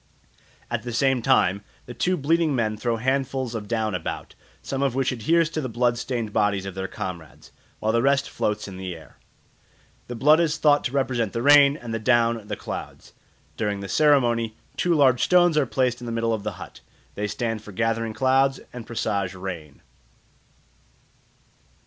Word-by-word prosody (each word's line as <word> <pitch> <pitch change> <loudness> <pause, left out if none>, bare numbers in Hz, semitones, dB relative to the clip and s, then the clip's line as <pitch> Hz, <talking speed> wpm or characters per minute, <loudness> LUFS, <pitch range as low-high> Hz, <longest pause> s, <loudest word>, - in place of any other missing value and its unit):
At - - -1
the 120 -1 -6
same 135 +1 +2
time 100 -3 +2 0.2
the 120 - -8
two 180 +8 0
bleeding 160 0 +1
men 110 -3 0
throw 115 +1 -1
handfuls 130 0 -1
of 110 -3 -5
down 110 -2 -1
about, 90 -3 -5 0.3
some 135 0 -3
of 135 -3 0
which 135 0 +1
adheres 160 +8 +2
to 155 - -2
the 130 - -4
blood 120 +1 +1
stained 115 -6 -3
bodies 105 -3 +1
of 95 - -5
their 95 0 -4
comrades, 85 -8 -8 0.3
while 110 - 0
the 115 +1 +2
rest 140 +1 +2
floats 105 0 -2
in 95 -2 -9
the 95 -2 -5
air. 80 - -16 0.9
The 125 - -6
blood 150 +7 +5
is 165 -2 +1
thought 145 -2 +3
to - - -1
represent 125 -6 -1
the 115 - -2
rain, 145 0 +6
and 120 -4 -7
the 115 - -2
down 115 -2 +2
the - - -3
clouds. - - -8 0.4
During 105 -2 -2
the 100 - -6
ceremony 120 -6 +2 0.2
two 175 -1 +1
large 130 -4 +4
stones 175 -2 +4
are 150 -3 +2
placed 125 -1 0
in 120 - -7
the - - -3
middle 115 0 0
of 110 - -2
the 105 0 -4
hut; - - -11 0.3
they 105 +1 -3
stand 115 0 -3
for 105 - -11
gathering 115 +2 -1
clouds 135 +1 +2
and 120 -2 -8
presage 100 -5 -2
rain. 85 -6 -8
120 Hz, 185 wpm, -24 LUFS, 105-135 Hz, 0.9 s, rain